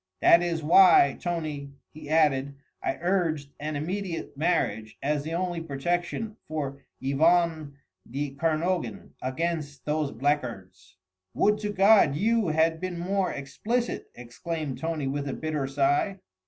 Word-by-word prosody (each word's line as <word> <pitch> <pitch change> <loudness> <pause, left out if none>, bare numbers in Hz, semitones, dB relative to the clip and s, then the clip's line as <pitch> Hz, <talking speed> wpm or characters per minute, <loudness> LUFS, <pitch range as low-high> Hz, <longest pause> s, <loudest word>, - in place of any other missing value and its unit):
That 170 - +6
is 170 -2 -2
why, 165 -3 +6
Tony," 155 -5 -4 0.2
he 155 -1 -10
added, 140 -3 +2 0.3
"I - - -2
urged 165 -5 0
an 150 +1 -3
immediate 175 +2 -4
marriage 145 -9 -1
as 145 +1 +1
the 160 +3 -4
only 175 -1 -1
real 165 - -9
protection 175 +9 -2
for 140 -3 -4 0.2
Yvonne 155 +1 +2 0.3
de 140 +3 -3
Kernogan 160 -2 -1
against 145 +1 -3
those 150 -1 0
blackguards." 100 -9 -3 0.4
"Would 210 0 +3
to 210 -1 -3
God 195 -7 +5
you 220 +4 +2
had 160 +1 +2
been 185 -1 -3
more 185 +1 0
explicit!" 225 - -3
exclaimed 140 +4 -5
Tony 160 -3 -2
with 140 +1 -2
a - - -3
bitter 155 -3 -2
sigh. 145 +8 +1
155 Hz, 135 wpm, -27 LUFS, 140-175 Hz, 0.4 s, That